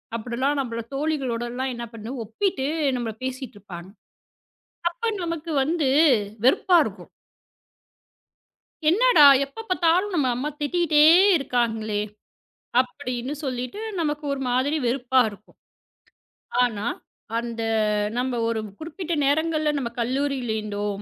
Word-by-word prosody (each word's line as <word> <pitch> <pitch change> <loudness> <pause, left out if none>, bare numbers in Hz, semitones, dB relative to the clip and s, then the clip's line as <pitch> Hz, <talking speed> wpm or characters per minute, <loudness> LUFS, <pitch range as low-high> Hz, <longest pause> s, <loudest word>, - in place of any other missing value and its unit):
அப்படிலாம் 250 +5 -1
நம்மள 230 -3 -3
தோழிகளோட 275 -5 -1
எல்லாம் 260 +1 -2
என்ன 235 0 -5
பண்ணு 225 +1 -7
ஒப்பிட்டு 265 - -1 0.3
நம்மள 230 -2 -3
பேசிட்டு 260 -2 -5
இருப்பாங்க. 185 -2 -10 1.0
அப்ப 450 +6 -3
நமக்கு 335 -1 -4
வந்து 305 0 0 0.6
வெறுப்பா 355 +7 +4
இருக்கும். - - -8 1.8
"என்னடா, 430 -4 +6 0.2
எப்பப் 445 +12 -11
பார்த்தாலும் 365 +3 +2
நம்ம 290 -6 +2
அம்மா 275 +5 -2
திட்டிக்கிட்டே 305 0 +2 0.3
இருக்காங்களே", 225 -6 -1 0.8
அப்படின்னு 255 0 -4
சொல்லிட்டு 255 - -4 0.2
நமக்கு 300 -1 -2
ஒரு 275 - -3
மாதிரி 260 +5 +1
வெறுப்பா 255 +1 +2
இருக்கும். 205 0 -17 1.1
ஆனா, 220 -4 -1 0.5
அந்த 235 -1 -4 0.6
நம்ம 250 0 -1
ஒரு 230 -1 -1 0.2
குறிப்பிட்ட 340 +2 -5
நேரங்கள்ல 310 +1 +1
நம்ம 255 -4 -2
கல்லூரியில 260 -1 -1
இருந்தோ, 205 -1 -4
265 Hz, 110 wpm, -24 LUFS, 235-310 Hz, 1.8 s, என்னடா